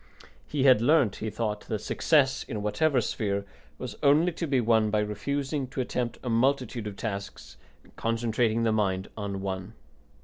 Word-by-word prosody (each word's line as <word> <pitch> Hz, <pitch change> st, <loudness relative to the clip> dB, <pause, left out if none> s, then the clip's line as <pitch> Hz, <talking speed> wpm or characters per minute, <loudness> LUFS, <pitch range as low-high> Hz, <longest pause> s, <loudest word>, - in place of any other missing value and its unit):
He 145 Hz, -3 st, -1 dB
had 130 Hz, -5 st, +6 dB
learnt, 130 Hz, -5 st, +3 dB
he 110 Hz, -, -3 dB
thought, 105 Hz, -1 st, -3 dB
that 110 Hz, -, -1 dB
success, 140 Hz, +5 st, +2 dB
in 105 Hz, -5 st, -5 dB
whatever 135 Hz, +5 st, +2 dB
sphere, 100 Hz, -2 st, -2 dB, 0.3 s
was -, -, -6 dB
only 155 Hz, +5 st, +4 dB
to 165 Hz, 0 st, -4 dB
be 135 Hz, -3 st, +2 dB
won 110 Hz, -2 st, +3 dB
by 105 Hz, -, +1 dB
refusing 135 Hz, +7 st, -2 dB
to 130 Hz, -, -7 dB
attempt 120 Hz, -2 st, -2 dB
a -, -, -6 dB
multitude 125 Hz, -1 st, +1 dB
of 100 Hz, -, -6 dB
tasks 100 Hz, -3 st, -6 dB, 0.3 s
and -, -, -23 dB
concentrating 115 Hz, 0 st, 0 dB
the 115 Hz, -, +2 dB
mind 95 Hz, -3 st, 0 dB
on 100 Hz, -2 st, -4 dB
one. 95 Hz, +1 st, -4 dB
115 Hz, 170 wpm, -28 LUFS, 105-135 Hz, 0.3 s, had